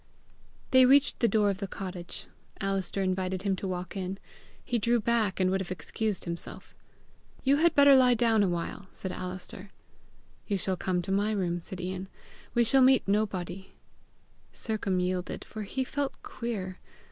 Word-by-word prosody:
They 260 0 +7
reached 275 +2 +4
the 235 - +4
door 210 -3 +3
of 195 - -5
the 200 - -3
cottage. 180 -2 -6 0.3
Alister 195 0 0
invited 185 0 -1
him 195 -2 +1
to 195 - -4
walk 180 0 -4
in. 190 0 -3 0.5
He 245 -2 0
drew 235 +2 +2
back, 220 -4 +1
and 185 0 +3
would 190 0 +1
have 185 - -5
excused 205 +3 -3
himself. 170 -1 -6 0.7
"You 275 +1 +4
had 335 +2 +3
better 280 -1 +8
lie 250 -2 +6
down 225 -2 +3
a 195 - +3
while," 175 +3 -4
said 190 - -5
Alister. 185 +2 -7 0.8
"You 200 - +1
shall 190 0 -1
come 180 -1 -1
to 195 - -4
my 200 +2 +2
room," 180 -5 -1
said 185 +2 -5
Ian. 185 +1 -4 0.5
"We 240 - +5
shall 265 +4 +4
meet 260 -3 +5
nobody." 195 -3 -1 0.8
Sercombe 200 -5 0
yielded, 180 0 -3
for 215 - -7
he 260 +6 -2
felt 285 +1 -2
queer. 195 -6 -5
195 Hz, 170 wpm, -29 LUFS, 185-230 Hz, 0.8 s, better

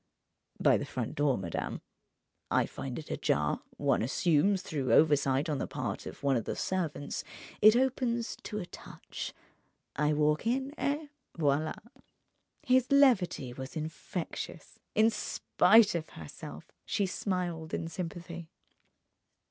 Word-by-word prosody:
"By - - +5
the - - -3
front - - -4
door, 145 -3 +2
madame. 85 -4 -3 0.7
I - - +3
find 130 -2 -6
it 155 - -7
ajar—one - - 0
assumes, 175 - +2
through 140 -7 -2
oversight 145 -1 +4
on 150 -3 -1
the - - -2
part - - -4
of - - -9
one 140 -1 +3
of 115 - -1
the - - -2
servants—it 185 +5 +1
opens 245 -2 +1
to 210 - -6
a 195 - -3
touch, - - -8 0.6
I 150 +1 +2
walk 150 +5 +2
in—et 280 +4 -1 0.3
voila!" 150 0 +1 0.9
His 260 -1 +3
levity 215 - +4
was 130 +4 -8
infectious. 160 +2 -5 0.2
In 220 +1 +5
spite 220 0 +4
of 165 -2 -3
herself, 80 -2 -10
she 200 - 0
smiled 180 -4 -2
in 165 - -2
sympathy. 170 0 -6
170 Hz, 125 wpm, -31 LUFS, 145-215 Hz, 0.9 s, By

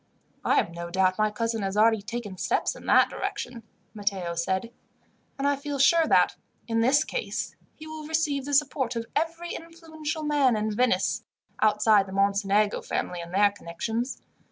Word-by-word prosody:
"I - - +2
have - - +2
no 170 0 -6
doubt 185 +2 +1
my 215 0 +3
cousin 225 +1 -2
has 195 +1 -2
already 220 0 +4
taken 210 -2 -6
steps - - 0
in - - -12
that - - +5
direction," 245 -1 -4 0.3
Matteo 200 -5 -2
said, 190 +6 -2 0.7
"and 275 0 0
I 285 - +3
feel 285 0 -5
sure 320 +4 +5
that, - - +3 0.3
in 225 -1 0
this 275 +6 +4
case, 475 - -4 0.2
he 310 - -11
will 315 -1 -8
receive 305 -4 0
the 285 0 0
support 270 -4 +1
of 230 0 -3
every 335 +2 -2
influential 320 -2 -6
man 290 -5 +3
in 215 0 -1
Venice, 230 -6 +1 0.4
outside 210 -1 +4
the 190 - -8
Mocenigo 200 +1 +2
family 175 -1 -3
and 170 0 -9
their 200 +2 +4
connections. 220 +7 -4
230 Hz, 170 wpm, -26 LUFS, 200-290 Hz, 0.7 s, that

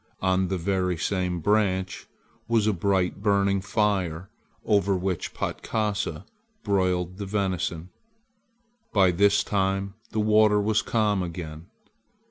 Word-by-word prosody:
On 95 0 +2
the 95 +1 -1
very 90 0 0
same 90 -1 -1
branch 95 -2 0 0.4
was 115 -2 +2
a 110 - +2
bright 95 0 0
burning 100 -2 +2
fire 95 -5 -1 0.3
over 100 -2 +2
which 90 -2 -2
Patkasa 105 -6 -2 0.4
broiled 90 -3 0
the 100 -1 -5
venison. 95 -4 -2 1.0
By 95 -3 +5
this 100 +3 +3
time 95 0 -1 0.2
the 110 - -3
water 105 0 +4
was 105 +1 +2
calm 105 -4 +1
again. 85 -2 -6
95 Hz, 115 wpm, -26 LUFS, 90-105 Hz, 1.0 s, By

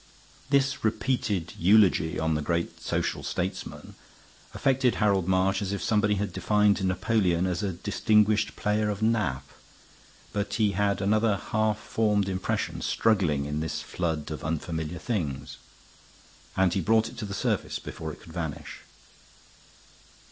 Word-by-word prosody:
This 140 -1 +2
repeated 110 -5 -1
eulogy 95 -3 +4
on 80 0 0
the 75 - 0
great 85 +2 -2
social - - -1
statesman 90 +2 -4 0.6
affected 130 -2 +2
Harold 100 -4 +2
March 95 +1 +2
as 100 -1 -2
if 100 - -3
somebody 105 -1 +2
had 100 -2 -3
defined 105 -1 +2
Napoleon 95 -1 +1
as 90 +1 -1
a 100 -3 -1
distinguished 105 +3 +2
player 105 0 0
of 105 +1 -3
nap. 95 - 0 0.9
But 105 0 -2
he 105 -3 +2
had 100 0 0
another 105 +1 +2
half 110 +1 0
formed 105 -2 0
impression 95 -1 -2
struggling 90 -11 +1
in 75 +1 -2
this 80 0 -3
flood 80 -4 -3
of 75 - -6
unfamiliar 80 +1 -3
things, 75 - -3 1.0
and 95 -2 +3
he 95 - 0
brought 110 +5 +3
it - - -11
to 105 - -3
the 100 -1 -5
surface - - -1
before 80 0 -7
it - - -12
could 80 - -13
vanish. 80 -4 -5
100 Hz, 140 wpm, -27 LUFS, 85-105 Hz, 1.0 s, eulogy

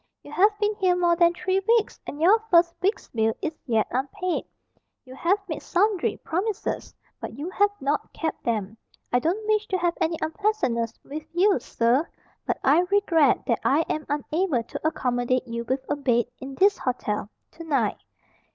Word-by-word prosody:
You - - -12
have 415 +3 +3
been 420 0 +1
here 370 -3 +3
more 345 -1 +3
than 340 0 +5
three 375 +2 0
weeks, 460 -2 +2
and 290 - -6
your 380 +8 +5
first 340 -1 +5
week's 395 +4 0
bill 225 -1 0
is 320 - -3
yet 225 -3 +2
unpaid. 335 +8 -2 0.6
You 255 - -11
have 340 +9 +2
made 315 - -4
sundry 400 +1 +1
promises, 390 +5 -3 0.2
but 225 - -7
you 315 +6 -5
have 410 +2 +3
not 285 +2 -1
kept 320 -2 -4
them. 220 -2 -2 0.4
I 245 - +5
don't 360 - -1
wish 430 0 +1
to 375 - 0
have 345 -1 +1
any 330 0 +1
unpleasantness 315 - -1
with 305 +2 -7
you, 380 -1 +3
sir, 245 +7 +1 0.4
but - - 0
I 285 +5 +5
regret 335 -9 +3
that 235 - +1
I 290 +4 +3
am 305 - -2
unable 295 -2 0
to 275 - -4
accommodate 250 -3 0
you 235 0 -4
with 260 +2 -2
a 290 - 0
bed, 245 -5 +1
in 265 +1 -7
this 400 +6 +4
hotel, 210 -5 -2 0.2
to 330 - -10
night." 275 -10 0
320 Hz, 180 wpm, -25 LUFS, 255-375 Hz, 0.6 s, than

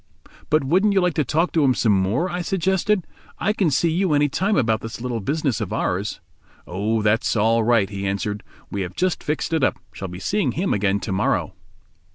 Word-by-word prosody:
"But 155 -1 +3
wouldn't 190 +9 +3
you 195 - +4
like 180 -2 +1
to 155 - +1
talk 160 +7 0
to 160 - +2
him 130 -2 +3
some 110 - +2
more?" 100 - +1
I 180 0 -3
suggested; 190 +2 0 0.3
"I 210 - 0
can 195 -6 +1
see 155 +4 +2
you 175 0 +1
any 145 0 +3
time 195 +9 0
about 110 -4 +1
this 115 0 -7
little 120 -1 -3
business 140 +1 -1
of 105 - -3
ours." 95 +4 -2 0.4
"Oh, 105 +4 -1
that's 105 +3 +2
all 115 +1 +3
right," 115 -3 +3
he 100 0 -4
answered, 105 +1 -2 0.3
"we 100 - -2
have 90 -1 -5
just 185 -1 0
fixed 150 +2 -2
it 160 -4 +1
up—shall 95 -6 -2
be 90 0 -8
seeing 140 - 0
him 185 +5 0
again 100 0 +1
to - - -4
morrow." 95 - 0
130 Hz, 205 wpm, -22 LUFS, 105-175 Hz, 0.4 s, you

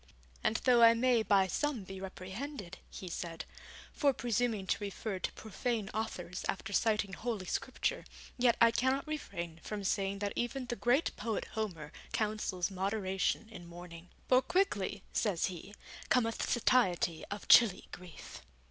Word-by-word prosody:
'And 220 - +2
though 245 -2 +6
I 230 0 +8
may 240 0 +3
by 200 -3 +4
some 265 +3 -1
be 190 0 -8
reprehended,' 195 +2 -7
he 185 - -8
said, 165 -1 -5 0.5
'for 285 -2 +3
presuming 230 -4 0
to 205 - -1
refer 200 0 -4
to - - -2
profane 220 -1 -3
authors 185 -5 -4
after 200 +1 -3
citing 210 -2 +1
Holy 220 -5 -3
Scripture, 270 - -2 0.3
yet 245 -2 +3
I 230 0 +7
cannot 260 +3 +1
refrain 175 - -5
from 210 -2 -5
saying 195 0 0
that 200 0 -2
even 250 +2 -2
the 240 -1 -3
great 245 +8 +2
poet 225 -3 -2
Homer 180 -9 -4 0.2
counsels 210 -4 -1
moderation 195 +2 -1
in 180 -6 -10
mourning, 170 0 -10 0.2
"for 255 0 +5
quickly," 225 - 0
says 195 -6 +1
he, 195 +4 -10 0.3
"cometh 230 -2 +1
satiety 185 -9 +2
of 205 0 -6
chilly 215 -6 +6
grief".' 180 -2 -10
210 Hz, 150 wpm, -33 LUFS, 185-240 Hz, 0.5 s, I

